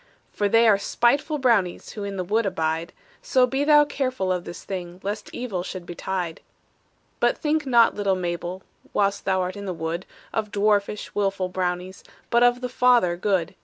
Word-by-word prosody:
"For 205 -1 0
they 230 +2 +5
are 205 -3 +5
spiteful 280 +9 +1
brownies 225 -10 +1
Who 210 - -6
in 200 -1 -4
the 185 - -1
wood 210 +4 +1
abide; 165 -2 -1 0.3
So 255 -1 +3
be 270 +3 -1
thou 295 0 +6
careful 255 -9 -2
of 180 -1 -2
this - - -8
thing, 180 -2 -6
Lest 205 +2 -4
evil 225 -8 -3
should 180 0 -7
betide. 175 -1 -4 0.8
"But - - +2
think 305 -1 0
not, 235 -3 +5
little 200 -2 0
Mabel, 175 +1 -4 0.3
Whilst 200 0 +1
thou 190 -1 +2
art 185 +1 -3
in 200 0 -7
the 185 - -3
wood, 165 +2 -4 0.3
Of 215 -1 -1
dwarfish, 205 0 0
willful 195 -2 0
brownies, 180 0 -3 0.3
But 235 0 +4
of 245 0 +4
the 250 - -2
Father 245 -8 +3
good. 185 -1 0
200 Hz, 180 wpm, -24 LUFS, 180-235 Hz, 0.8 s, thou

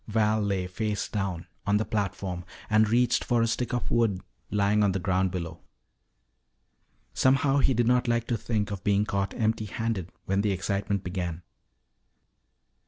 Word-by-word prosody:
Val 110 0 +2
lay, 100 -3 0
face 105 +3 -2
down, 95 -5 -3 0.2
on 100 +1 +4
the 110 - 0
platform 100 -4 -2 0.3
and 110 0 +4
reached 120 +1 +3
for 120 -1 +2
a - - +2
stick 120 +2 -1
of 120 -1 -2
wood 115 -5 +2 0.3
lying 105 +1 +2
on 100 -2 +3
the 95 - -1
ground 95 0 +1
below. 85 -3 -5 1.5
Somehow 135 +1 +3
he 135 -2 +3
did 120 +1 +2
not 125 +1 +3
like 120 -1 +1
to 120 - +2
think 105 -2 -2
of 100 -2 -5
being 105 0 +2
caught 100 -1 -2
empty 110 -1 0
handed 105 -4 -3
when 95 +1 +1
the 100 -1 +1
excitement 100 +1 -1
began. 90 -2 -4
105 Hz, 165 wpm, -27 LUFS, 95-115 Hz, 1.5 s, on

